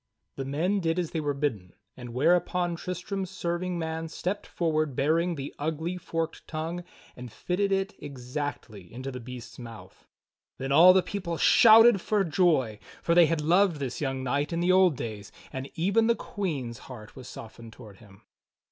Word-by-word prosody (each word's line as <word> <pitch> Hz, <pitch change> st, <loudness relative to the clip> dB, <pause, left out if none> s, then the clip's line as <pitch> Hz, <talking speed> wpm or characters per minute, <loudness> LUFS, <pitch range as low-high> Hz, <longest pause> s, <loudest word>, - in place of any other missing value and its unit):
The 135 Hz, -, -4 dB
men 170 Hz, +9 st, 0 dB
did 165 Hz, -2 st, 0 dB
as 175 Hz, -3 st, -2 dB
they 165 Hz, -, -2 dB
were 145 Hz, -2 st, -1 dB
bidden, 110 Hz, -11 st, -3 dB, 0.2 s
whereupon 170 Hz, +8 st, +1 dB
Tristram's 185 Hz, +2 st, -4 dB
serv 175 Hz, -2 st, -3 dB
ing 180 Hz, -1 st, -2 dB
man 160 Hz, 0 st, -3 dB
stepped 180 Hz, +5 st, -4 dB
forward 155 Hz, -5 st, -1 dB
bearing 165 Hz, +6 st, +1 dB
the 140 Hz, -1 st, -6 dB
ugly, 160 Hz, +4 st, -2 dB
forked 165 Hz, -2 st, -4 dB
tongue 165 Hz, +2 st, -4 dB, 0.3 s
and 125 Hz, -1 st, -9 dB
fitted 195 Hz, -, -1 dB
it 195 Hz, +1 st, 0 dB
exactly 125 Hz, -, -6 dB
into 130 Hz, +3 st, -6 dB
the 125 Hz, -, -6 dB
beast's 125 Hz, +1 st, -10 dB
mouth. 115 Hz, -2 st, -12 dB, 0.5 s
Then 135 Hz, +1 st, -4 dB
all 175 Hz, +6 st, +8 dB
the 185 Hz, -1 st, +4 dB
people 180 Hz, -5 st, -4 dB
shouted 225 Hz, 0 st, +7 dB
for 210 Hz, +1 st, +1 dB
joy; 155 Hz, -, +1 dB, 0.2 s
for 170 Hz, -, +2 dB
they 170 Hz, -1 st, +7 dB
had 165 Hz, -1 st, 0 dB
loved 175 Hz, +3 st, +3 dB
this 135 Hz, -2 st, -5 dB
young 135 Hz, -2 st, -2 dB
knight 140 Hz, +4 st, -1 dB
in 170 Hz, -, -1 dB
the 175 Hz, +1 st, +2 dB
old 185 Hz, -6 st, +4 dB
days; 105 Hz, -4 st, -6 dB, 0.2 s
and 130 Hz, +1 st, -5 dB
even 200 Hz, +7 st, +2 dB
the 235 Hz, -, +3 dB
Queen's 140 Hz, -, -4 dB
heart 110 Hz, -5 st, -10 dB
was 130 Hz, -2 st, -10 dB
softened 115 Hz, 0 st, -10 dB
toward 110 Hz, -5 st, -13 dB
him. 100 Hz, -3 st, -18 dB
160 Hz, 175 wpm, -27 LUFS, 130-180 Hz, 0.5 s, all